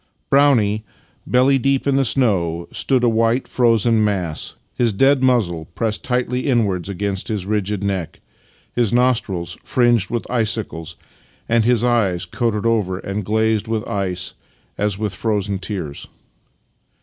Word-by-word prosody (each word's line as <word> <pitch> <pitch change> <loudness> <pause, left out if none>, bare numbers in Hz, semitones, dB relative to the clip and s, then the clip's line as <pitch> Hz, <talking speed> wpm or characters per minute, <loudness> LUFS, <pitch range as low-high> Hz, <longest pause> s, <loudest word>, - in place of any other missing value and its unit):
Brownie, 120 -7 +3 0.4
belly 130 +2 +3
deep 135 +1 +1
in 140 -1 +2
the 135 - +3
snow, 90 -10 +1
stood 130 -3 +1
a - - +4
white 115 +2 +1
frozen 115 -2 +3
mass, 90 -7 -2 0.2
his 120 -2 +1
dead 135 +6 +3
muzzle 105 -11 +1
pressed 110 -2 -2
tightly 125 +1 -1
inwards 100 -8 +1
against 100 0 -2
his 105 -4 -3
rigid 105 -1 -1
neck, 95 -5 -3 0.5
his 120 -4 +1
nostrils 120 -9 0
fringed 120 -6 +2
with 120 -1 -2
icicles, 105 -8 -2 0.5
and 115 -1 +2
his 120 -1 +2
eyes 105 -8 +1
coated 110 +3 -2
over 105 -5 +1
and 100 +2 -4
glazed 110 +1 +1
with 110 -1 -2
ice 90 -3 -2 0.4
as 105 -2 -1
with 105 -2 -2
frozen 100 0 -1
tears. 90 -7 -5
110 Hz, 135 wpm, -20 LUFS, 95-120 Hz, 0.5 s, a